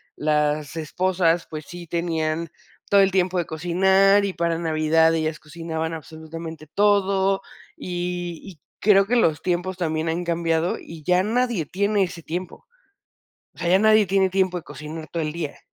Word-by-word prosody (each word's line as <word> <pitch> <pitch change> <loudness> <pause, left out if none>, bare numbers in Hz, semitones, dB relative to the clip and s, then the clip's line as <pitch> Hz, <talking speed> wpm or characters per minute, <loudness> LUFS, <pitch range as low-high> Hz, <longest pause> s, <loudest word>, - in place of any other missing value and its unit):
las 150 0 0
esposas, 175 +1 0
pues 155 -1 -7
sí 175 -1 -9
tenían 165 -1 -1 0.4
todo 200 -1 +6
el 195 0 +3
tiempo 185 -1 +1
de 175 - 0
cocinar 190 +5 +3
y 195 - -2
para 170 -1 -1
Navidad 160 0 +3
ellas 155 -1 -2
cocinaban 160 +1 -5
absolutamente 160 0 -8
todo, 195 +1 +2 0.3
y 175 -1 -4
y 185 -6 -12 0.2
creo 195 -1 +5
que 245 - +1
los 165 -10 +2
tiempos 180 +1 -1
también 160 -2 -1
han 170 +2 -1
cambiado 170 0 0
y 165 -2 -11
ya 180 +4 +3
nadie 230 -4 0
tiene 200 +5 +1
ese 175 -2 -5
tiempo, 175 +3 -6 0.9
o - - -23
sea, 170 - -2
ya 185 +2 +5
nadie 215 -1 +5
tiene 190 0 +2
tiempo 185 -1 +1
de - - -10
cocinar 155 +1 -8
todo 170 - -2
el 150 -1 -2
día. 160 -3 -5
170 Hz, 165 wpm, -23 LUFS, 160-190 Hz, 0.9 s, todo